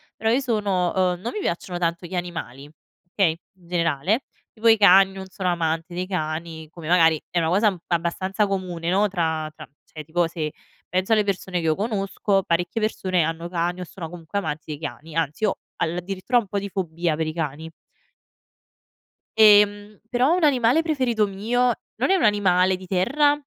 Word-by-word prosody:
però 220 - -1
io 245 - +3
sono 205 -8 0
uhm, 180 -2 +1
non 230 - -3
mi 430 - -3
piacciono 175 - -3
tanto 170 0 -1
gli 180 +2 -6
animali, 165 -6 -5 0.4
okay, 165 -5 +2 0.2
in 175 -2 -21
generale. 170 - 0 0.3
Tipo 225 +1 -1
i 225 0 +7
cani, 195 -1 +7
non 190 0 -8
sono 185 -1 -3
amante 165 0 -1
dei 180 +1 -3
cani 160 -2 -4
come 160 -1 -10
magari 165 -3 +4
è 175 - 0
una 165 - +1
cosa 200 +5 +3
un 190 - -5
abbastanza 185 +4 0
comune, 180 -4 -3
no, 200 +3 +3
tra 160 -4 -1
tra - - -11
mhmm, - - -43
cioè 155 - -9
tipo 170 +3 +1
se 160 -3 -4 0.3
penso 185 +4 -1
alle 215 -1 +4
persone 190 -2 -2
che 165 - -4
io 160 -1 +2
conosco 195 -1 0
parecchie 175 +5 -1
persone 185 -5 0
hanno 165 +2 -3
cani 175 +1 -2
o - - -3
sono 170 -2 -8
comunque 175 +3 -4
amanti 150 -6 -4
dei 150 -2 -6
cani. 155 +1 -7
Anzi 165 +3 -1
io 210 - +1 0.2
addirittura 185 +7 -1
ho - - +4
un 210 - -13
po' 200 +1 -2
di 200 0 -5
fobia 170 -4 -2
per 160 0 -2
i 155 - -3
cani 160 0 -4 1.7
ehm, 205 -1 +5
però 255 +6 +3
un 365 - 0
animale 260 0 +4
preferito 255 -9 +1
mio 235 +6 +1 0.3
non - - +2
è 385 - +5
un 360 - +1
animale 190 -3 +3
di 185 0 -12
terra, 275 +11 +3
180 Hz, 190 wpm, -23 LUFS, 165-205 Hz, 1.7 s, i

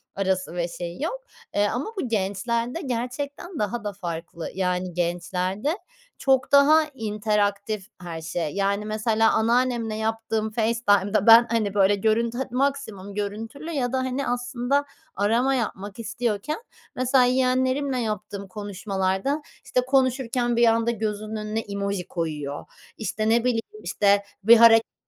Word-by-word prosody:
arası 190 -3 -1
ve 175 -1 -1
şeyi 175 +7 -6
yok. - - -3 0.3
Eee, 205 0 +3
ama 245 +4 -2 0.2
bu - - -3
gençlerde 230 - -1
gerçekten 280 +6 -4
daha 210 +2 -2
da 205 -1 -3
farklı. 170 -3 -6
Yani 180 -1 -1
gençlerde 180 - -1 0.4
çok 265 -1 +2
daha 290 +3 +7
interaktif 210 -2 -1
her 170 -2 -6
şey. 160 -1 -3
Yani 200 +1 0
mesela 220 +1 +2
anneannemle 235 0 +1
yaptığım 220 0 -2
FaceTime'da 215 -3 +2
ben 230 +1 +9
hani 215 -4 0
böyle 200 0 +4
görüntü 225 +3 +1
het 265 - -3
maksimum 250 -7 -2
görüntülü 225 +10 -5
ya 255 -6 -1
da - - +2
hani 260 +1 -2
aslında 245 +3 0 0.3
arama 230 +7 +2
yapmak 205 -4 -4
istiyorken 230 - -2 0.3
mesela 255 +1 +3
yeğenlerimle 260 +2 +1
yaptığım 210 -3 -4
konuşmalarda, 200 +6 -2 0.2
işte, 250 - +1
konuşurken 255 -2 +1
bir 235 0 +5
anda 230 +1 +3
gözünün 215 -1 -3
önüne 215 +1 -3
emoji 200 -3 -3
koyuyor. 150 -4 -4 0.3
İşte 215 0 -2
ne 230 +1 +3
bileyim, 245 -2 +1 0.2
işte 200 -1 +2 0.2
bir 230 +3 +8
hareketler 225 0 +6
220 Hz, 135 wpm, -24 LUFS, 200-245 Hz, 0.4 s, ben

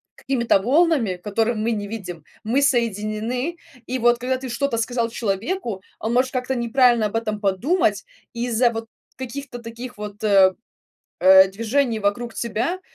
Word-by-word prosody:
какими-то 235 -6 +1
волнами, 275 - +2
которые 220 +5 -1
мы 220 +2 -1
не 205 -2 -3
видим, 185 -7 -7 0.2
мы 240 +6 +1
соединены. 235 - -1 0.3
И, 260 - -2
вот, 240 0 +3
когда 255 +2 -1
ты 260 0 -7
что-то 240 0 -1
сказал 230 0 -1
человеку, 225 - -3 0.2
он 225 +2 -2
может 255 +1 +2
как-то 255 0 -2
неправильно 240 -1 +3
об 210 - -8
этом 215 -2 -2
подумать. 210 - +1 0.3
Из-за, 240 0 +1
вот, 225 -1 -5 0.3
каких-то 260 0 -7
таких, 235 +1 -9
вот, 210 0 -8
э, 195 -3 +5 1.0
движений 230 +4 0
вокруг 215 +3 -1
тебя, 235 - -2
235 Hz, 145 wpm, -22 LUFS, 215-255 Hz, 1.0 s, э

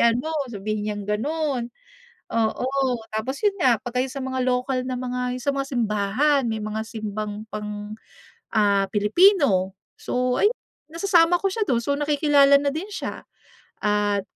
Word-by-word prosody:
ano", 245 +7 +2 0.2
sabihin 215 -1 -3
niyang 205 -1 -4
gano'n. 255 +4 -1 0.6
Oo, 230 +2 0 0.4
tapos, 220 +6 -4
'yon 410 -2 +1
nga, 255 - +3
pagka 250 0 -1
yung 265 - -7
sa 275 - -5
mga 260 0 -3
lokal 255 0 0
na 255 -1 -3
mga, 250 0 -2
'yon 255 - -6
sa 280 - +1
mga 275 - -1
simbahan, 240 +5 +1
may 220 -2 -2
mga 215 +1 -3
simbang 215 -1 -5
pang, 210 0 -6 0.6
ah, 200 -2 +3
Pilipino, 210 - +4 0.2
so, 250 0 -1
ayun, 425 +4 +3 0.4
nasasama 345 -1 +3
ko 390 - +1
siya 425 +2 -1
do'n, 240 -9 +1
so, 280 +4 -1
nakikilala 290 -1 +4
na 285 - +1
din 315 +7 -4
siya. - - -5 0.6
At 205 -1 +1
250 Hz, 155 wpm, -24 LUFS, 215-285 Hz, 0.6 s, Pilipino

